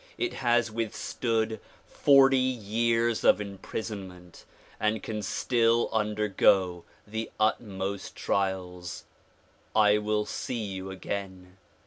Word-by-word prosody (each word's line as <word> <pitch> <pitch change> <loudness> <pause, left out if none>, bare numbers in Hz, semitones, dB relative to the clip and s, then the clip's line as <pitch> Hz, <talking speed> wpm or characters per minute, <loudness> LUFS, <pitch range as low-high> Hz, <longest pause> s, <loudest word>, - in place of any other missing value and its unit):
It 365 -1 -1
has 120 -2 +1
withstood 115 0 -2 0.3
forty 135 -2 +5
years 115 -1 +1
of - - +5
imprisonment 95 -3 -7 0.3
and 110 -1 0
can 110 -1 -4
still 115 +3 +2
undergo 105 -4 +2 0.2
the 110 +2 -4
utmost 100 -3 -1
trials. 90 -2 -2 0.7
I 105 -1 +5
will 105 0 0
see 115 +2 -4
you 95 -2 -5
again. 95 -1 -6
105 Hz, 95 wpm, -28 LUFS, 95-115 Hz, 0.7 s, forty